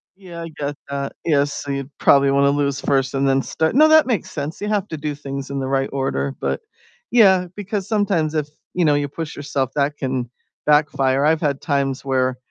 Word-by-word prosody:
Yeah, 175 -3 -10
I 165 - -6
get 145 0 -2
that. 140 0 -3
Yeah, 145 -4 +3
so, 145 -1 -5
you 140 0 -3
probably 140 0 +5
want 140 0 +3
to - - +5
lose 140 -1 0
1st 135 -1 +1
and 135 0 +1
then 135 0 +3
start 160 - -1
no, 310 +2 +7
that 315 -3 +6
makes 225 -9 -1
sense 145 +2 -5
you 210 - -2
have 210 -2 0
to 160 - -4
do 145 0 -3
things 140 -1 -6
in 140 0 -3
the 130 - -2
right 135 0 0
order, 135 0 -1
but - - -2 0.5
yeah, 190 -6 +5
because 200 -1 -4
sometimes 195 -8 0
if, 150 -1 0 0.3
you 175 -2 +2
know, 150 - +4
you 145 0 0
push 155 +2 -6
yourself, 140 -2 -2
that 145 +1 0
can 130 -3 -2 0.4
backfire, 140 -2 +3
I've 160 +1 +3
had 140 -3 0
times 140 -3 -1
where, 130 -1 +1
145 Hz, 215 wpm, -21 LUFS, 135-165 Hz, 0.5 s, no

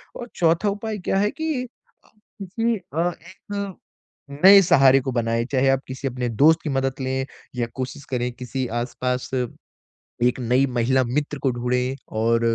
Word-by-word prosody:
और 240 - -7
चौथा 170 +4 +2
उपाय 210 +2 -4
क्या - - +2
है 205 +1 +2
कि 315 -5 -2 0.8
किसी 225 +5 -1 0.2
अ, 170 +2 +2
एक 170 +3 -15 1.1
नए 195 +1 +10
सहारे 135 -5 +6
को 130 0 -3
बनाएं, 115 -1 0
चाहे 135 -1 +2
आप 135 0 +3
किसी 130 +1 -4
अपने 125 -1 -3
दोस्त 150 +8 +4
की 155 - -3
मदद 135 -1 0
लें 130 0 -1 0.3
या 120 -1 -1
कोशिश 130 +1 -5
करें 125 -1 -1
किसी 125 +2 -4
आसपास 125 +1 -3 0.9
एक 125 +1 +2
नई 125 +2 +2
महिला 130 +3 +3
मित्र 145 +4 -2
को 135 - +2
ढूँढे 125 +2 -1
और 115 +1 +1
130 Hz, 160 wpm, -23 LUFS, 125-165 Hz, 1.1 s, नए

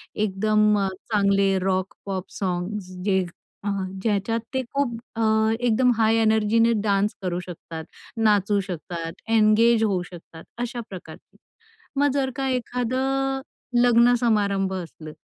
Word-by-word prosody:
एकदम 210 +1 +2
अ, 195 - +1 0.2
चांगले 200 -2 +3
rock, 185 0 -1
pop 190 -1 -4
songs. 185 +1 -3
जे 190 -2 +3 0.4
अ, - - -4 0.3
ज्याच्यात 220 +2 0
ते 260 - +1
खूप 265 -5 0 0.2
अ, 230 - -2 0.4
एकदम 245 +1 +3
हाय 225 0 +3
एनर्जीने 220 +1 +3
डान्स 200 0 +1
करू 180 -1 -2
शकतात, 165 -2 -8 0.3
नाचू 205 -2 +3
शकतात, 165 -1 -5 0.2
एन्गेज 225 +1 +4
होऊ 195 -4 +1
शकतात 165 -1 -12 0.2
अशा 240 0 -3
प्रकारची. 175 -4 -11 0.6
मग 290 - +4
जर 270 -2 0
का 270 -1 -2
एखादं 260 +2 -1 0.4
लग्न 240 0 +5
समारंभ 200 -5 +1
असलं, 165 -4 -7
210 Hz, 125 wpm, -24 LUFS, 190-235 Hz, 0.6 s, लग्न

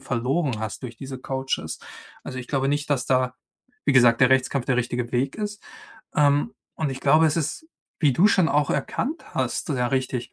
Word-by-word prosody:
verloren 135 +1 -1
hast 110 -1 -5
durch 120 -2 -7
diese 130 +1 -7
Coaches. 130 0 -3 0.5
Also, 130 - -6
ich 125 - -8
glaube 135 -2 0
nicht, 145 +1 -1
dass 135 -4 +1
da, 130 -1 +1 0.5
wie - - +3
gesagt, 120 -3 +5
der 130 - +6
Rechtskampf 130 0 +2
der 130 - +2
richtige 120 0 -2
Weg 130 +6 0
ist. 210 -1 -5 0.5
Ähm, 145 +8 +3 0.2
und 155 -3 -2
ich 135 0 -6
glaube, 155 +4 +5
es 155 +1 +1
ist, 165 - -2 0.3
wie 150 -5 +4
du 175 +10 +5
schon 185 -5 +3
auch 145 0 +2
erkannt 305 +7 -3
hast, - - -1
ja 125 -3 +1
richtig, 130 -2 -2
135 Hz, 190 wpm, -24 LUFS, 125-150 Hz, 0.5 s, der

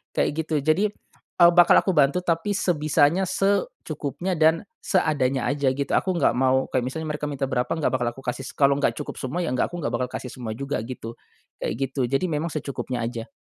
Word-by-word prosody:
kayak - - +2 0.2
gitu. 155 -2 0
Jadi, 155 +8 +3
eee, 175 -3 +1
bakal 175 0 +6
aku 190 - +1
bantu 150 +2 +3
tapi 175 +4 0
sebisanya, 155 0 +2
secukupnya, 190 - -1
dan 160 +1 +4 0.2
seadanya 140 - +1
aja 140 -2 +1
gitu. 140 0 -3
Aku 185 -1 +1
gak 170 - +3
mau 130 0 +2
kayak 125 -1 0
misalnya 160 +4 -4
mereka 150 0 -3
minta 140 -1 -4
berapa 125 -2 0
gak 155 -6 0
bakal 125 -1 0
aku 135 - -11
kasih 125 +1 -4
se - - -9
kalo 140 0 +3
nggak - - +1
cukup 150 - -6
semua 145 +7 -2
ya 170 - -2
gak 125 - +1
aku 175 -2 -5
gak 115 - -1
bakal 125 +1 -1
kasih 125 0 -6
semua 115 -4 -6
juga 140 +2 -3
gitu, 115 -2 -7 0.4
kayak - - -2 0.2
gitu. 135 0 -3
Jadi 135 +8 0
memang 150 +2 -1
secukupnya 130 -5 -4
aja. 115 -1 -4
145 Hz, 205 wpm, -24 LUFS, 130-170 Hz, 0.4 s, bakal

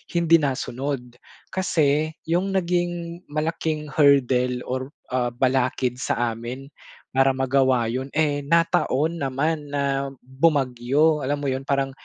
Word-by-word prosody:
hindi 170 -1 +5
nasunod. 130 -2 -3 0.4
Kasi 155 -4 +1 0.2
'yung 180 +4 +1
naging 175 -1 -1
malaking 155 0 -2
hurdle 130 -4 +3
or 130 +2 -3 0.2
ah, 125 -1 0
balakid 130 -1 +1
sa 120 -2 0
amin 125 +5 -7 0.4
para 135 0 +4
magawa 130 -2 +2
'yun, 130 +2 -3
eh, 150 -2 +2
nataon 165 -1 +2
naman 145 +3 -1
na 140 -1 -1 0.2
bumagyo, 135 +2 +2
alam 145 +1 0
mo - - -1
'yun, 130 +1 -3
parang 135 -1 0
140 Hz, 120 wpm, -23 LUFS, 130-155 Hz, 0.4 s, hindi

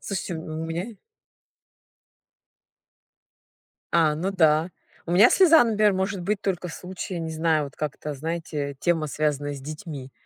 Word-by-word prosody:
Слушайте, 190 -3 -4
ну 160 0 -5
у - - -3
меня. 175 +8 -4 3.0
А, 160 -3 +4
ну 180 +6 -2
да. 160 -2 +3 0.4
У 170 - -2
меня 210 +7 +7
слеза, 330 -8 +6
например, 210 -2 +3
может 190 0 -2
быть 205 +2 -1
только 180 -2 -2
в - - -8
случае, 180 0 -6
не 160 -1 -4
знаю, 160 -1 +1
вот 140 - -10
как-то, 150 0 -4
знаете, 150 -2 -4
тема, 165 -2 +1
связанная 145 -1 -1
с 135 - -8
детьми. 145 -2 -8
165 Hz, 145 wpm, -25 LUFS, 150-190 Hz, 3.0 s, меня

